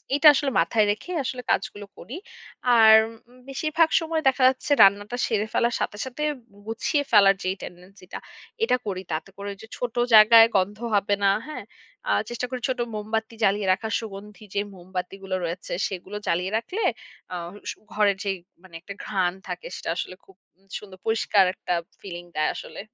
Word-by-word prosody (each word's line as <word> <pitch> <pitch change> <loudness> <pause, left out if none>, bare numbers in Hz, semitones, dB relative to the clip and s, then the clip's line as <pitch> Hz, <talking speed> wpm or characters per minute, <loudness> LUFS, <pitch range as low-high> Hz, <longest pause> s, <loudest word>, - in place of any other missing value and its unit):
এটা 295 +2 +3
আসলে 275 0 0
মাথায় 210 +6 +2
রেখে 215 +12 -4
আসলে 250 -1 -4
কাজগুলো 205 0 -1
করি। 265 - -8 0.6
আর 220 -1 +8 0.4
উম 250 - -19
বেশিরভাগ 310 +4 +1
সময় 325 -1 -2
দেখা 265 0 +1
যাচ্ছে 260 +2 -1
রান্নাটা 205 +4 +4
সেরে 215 -2 0
ফেলার 235 0 +1
সাথে, 205 - -2
সাথে 260 +4 -6 0.4
গুছিয়ে 235 +6 0
ফেলার 195 -2 +7
যে 185 - 0
টেনডেন্সি 180 +2 -11
টা - - -4 0.5
এটা 250 - +3
করি 190 -2 -3
তাতে 160 +5 -3
করে 200 0 -5
যে 220 - -10
ছোট 245 -2 -4 0.2
জায়গায় 225 +1 +9
গন্ধ 200 +3 0 0.2
হবে 205 0 +2
না। - - +6 0.2
হ্যাঁ? 275 -8 -7 0.4
আ - - +1 0.2
চেষ্টা 240 +1 -3
করি 255 -1 -4
ছোট 260 - -1 0.2
মোমবাতি 220 +2 -3
জ্বালিয়ে 200 0 +2
রাখার 220 +3 -2
সুগন্ধি 210 0 -10
যে 200 - +1
মোমবাতিগুলো 185 +1 -6
রয়েছে, 170 +2 -5 0.2
সেগুলো 190 +2 -7
জ্বালিয়ে 180 +4 0
রাখলে 365 - -3 0.5
আ - - -3 0.3
স - - -3 0.2
ঘরে 210 -1 +3
যে 200 - -1 0.3
মানে 185 -3 -17
একটা 200 +3 -9
ঘ্রাণ 185 -3 0 0.2
থাকে, 180 0 -6
সেটা - - -4
আসলে 185 - -4
খুব 195 - -20 0.4
সুন্দর 195 -3 -13
পরিষ্কার 220 -3 +3
একটা 180 - -3 0.3
ফিলিং 175 -3 -8
দেয় 155 - +2
আসলে। - - -8
210 Hz, 170 wpm, -25 LUFS, 190-240 Hz, 0.6 s, জায়গায়